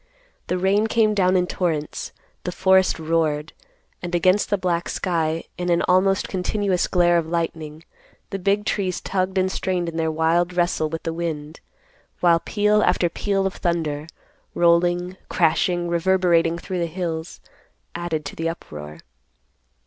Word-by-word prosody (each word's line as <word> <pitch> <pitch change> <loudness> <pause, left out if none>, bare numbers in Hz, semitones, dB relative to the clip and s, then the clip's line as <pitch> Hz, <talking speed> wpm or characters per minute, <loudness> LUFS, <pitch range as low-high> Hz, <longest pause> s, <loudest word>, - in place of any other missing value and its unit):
The 180 - 0
rain 195 +4 +2
came 220 -1 +2
down 185 -2 +3
in 180 - +2
torrents; 160 -5 -2 0.3
the 180 - -3
forest 190 +1 +3
roared; 160 -2 -1 0.5
and 175 0 -3
against 185 +4 +3
the 205 - +2
black 175 -2 -1
sky, 165 -3 -1 0.2
in 175 0 -2
an 170 -1 +2
almost 190 +1 +2
continuous 190 0 0
glare 175 -1 +3
of 160 - -4
lightning, 160 -2 -3 0.5
the 195 - -3
big 200 +2 +1
trees 190 -5 -1
tugged 190 0 -2
and 185 0 +2
strained 180 -2 -1
in 165 -1 -5
their 160 -1 +1
wild 165 +3 +1
wrestle 175 -3 +1
with 165 +1 -5
the 165 - -2
wind; 160 -2 -4 0.6
while 170 -1 +4
peal 210 +3 +2
after 175 - +2
peal 195 +2 -1
of 195 - -1
thunder, 155 -3 -2 0.5
rolling, 175 +1 +2
crashing, 175 +1 +1
reverberating 170 -1 +2
through 180 +1 -4
the 170 - 0
hills, 165 -1 -4 0.5
added 165 -3 -3
to - - -6
the 165 0 -1
uproar. 75 - -8
175 Hz, 150 wpm, -22 LUFS, 165-185 Hz, 0.6 s, while